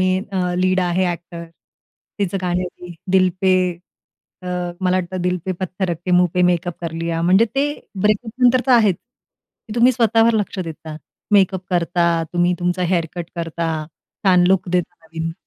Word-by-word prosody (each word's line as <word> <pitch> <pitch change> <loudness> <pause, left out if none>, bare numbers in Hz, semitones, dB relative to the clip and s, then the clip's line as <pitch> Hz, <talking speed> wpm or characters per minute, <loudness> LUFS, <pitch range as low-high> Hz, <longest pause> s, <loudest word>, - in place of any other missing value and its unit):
Main 185 +2 +1
अ, 180 -2 -1
lead 185 0 +2
आहे, 180 +1 +1
actor, 170 0 -9 0.7
तिचं 195 -1 -1
गाणं 180 0 0
आहे 185 - -2 0.2
ते, 175 - -9 0.2
दिल 185 -1 +5
पे 190 -1 +3 0.9
अ, - - -9 0.3
मला 185 0 +2
वाटतं, 185 0 -3
दिल 180 0 +1
पे 190 - -1
पत्थर 185 +1 -3
रख 170 - -2
के 185 - -2
मुँह 180 0 +4
पे 180 - +2
मेकअप 175 -1 +1
कर 170 -2 -4
लिया. 165 0 -2
म्हणजे 185 +6 +5
ते 275 +1 +2 0.4
ब्रेकअपनंतर 235 +4 +2
तर - - +1
आहेच, 215 -7 +4 0.7
की - - -6
तुम्ही 240 +2 +5
स्वतःवर 230 -1 +3
लक्ष 205 -2 -2
देता, 160 -3 -6 0.4
मेकअप 190 -2 +3
करता, 175 -1 +1 0.2
तुम्ही 175 0 +2
तुमचा 180 +1 -1
हेअरकट 175 -1 -2
करता, 165 0 -3 0.5
छान 180 -2 +5
लूक 190 -1 +2
देता, 175 -1 -1
नवीन. 165 0 -4
180 Hz, 170 wpm, -20 LUFS, 175-190 Hz, 0.9 s, दिल